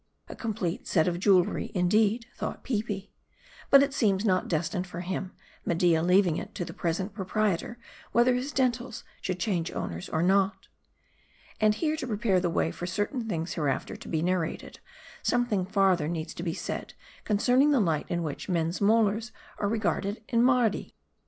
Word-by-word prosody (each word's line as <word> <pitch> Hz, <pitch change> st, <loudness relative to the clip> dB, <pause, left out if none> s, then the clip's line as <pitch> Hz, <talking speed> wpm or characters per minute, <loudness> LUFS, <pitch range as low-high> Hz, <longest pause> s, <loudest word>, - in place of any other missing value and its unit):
A -, -, -8 dB
complete 200 Hz, -6 st, -3 dB
set 160 Hz, -2 st, +2 dB
of 175 Hz, -1 st, -1 dB
jewelry, 185 Hz, -2 st, +3 dB
indeed, 210 Hz, +5 st, +2 dB
thought -, -, -5 dB
Peepi. 210 Hz, -4 st, -3 dB, 0.6 s
But, 275 Hz, 0 st, +8 dB
it 280 Hz, -1 st, -1 dB
seems, 205 Hz, -6 st, +2 dB
not 185 Hz, -3 st, +2 dB
destined 175 Hz, +3 st, -1 dB
for 175 Hz, -1 st, -6 dB
him; 185 Hz, +1 st, -4 dB, 0.3 s
Media 170 Hz, -1 st, +2 dB
leaving 180 Hz, -1 st, +3 dB
it -, -, -7 dB
to 175 Hz, -, -3 dB
the -, -, -8 dB
present 180 Hz, +4 st, -2 dB
proprietor, 210 Hz, +2 st, -1 dB, 0.3 s
whether 240 Hz, +2 st, +4 dB
his 255 Hz, +3 st, -2 dB
dentals 250 Hz, -3 st, -1 dB, 0.2 s
should 185 Hz, -1 st, -3 dB
change 175 Hz, -4 st, -1 dB
owners 85 Hz, +1 st, -5 dB
or 160 Hz, -, 0 dB
not. 195 Hz, +2 st, +2 dB, 0.9 s
And 215 Hz, -1 st, +4 dB
here, 310 Hz, +5 st, 0 dB
to 295 Hz, -, -4 dB
prepare 210 Hz, -4 st, +1 dB
the 175 Hz, -1 st, 0 dB
way 165 Hz, -1 st, 0 dB
for 175 Hz, -, -6 dB
certain 225 Hz, +5 st, -2 dB
things 165 Hz, -3 st, -2 dB
hereafter 145 Hz, -5 st, -1 dB
to -, -, -11 dB
be 160 Hz, -1 st, -1 dB
narrated, 175 Hz, -2 st, -2 dB, 0.4 s
something 235 Hz, -7 st, +1 dB
farther 190 Hz, -6 st, +2 dB
needs 160 Hz, -1 st, -4 dB
be 170 Hz, -1 st, -3 dB
said -, -, -5 dB, 0.3 s
concerning 250 Hz, +7 st, +3 dB
the 285 Hz, -3 st, +4 dB
light 165 Hz, -7 st, 0 dB
in 175 Hz, -1 st, -1 dB
which 155 Hz, +4 st, -5 dB
men's 170 Hz, 0 st, 0 dB
molars 220 Hz, +2 st, +2 dB, 0.3 s
are 205 Hz, -, 0 dB
regarded 205 Hz, 0 st, -1 dB
in 235 Hz, -, +2 dB
Mardi. 245 Hz, -4 st, +2 dB
195 Hz, 165 wpm, -28 LUFS, 175-225 Hz, 0.9 s, But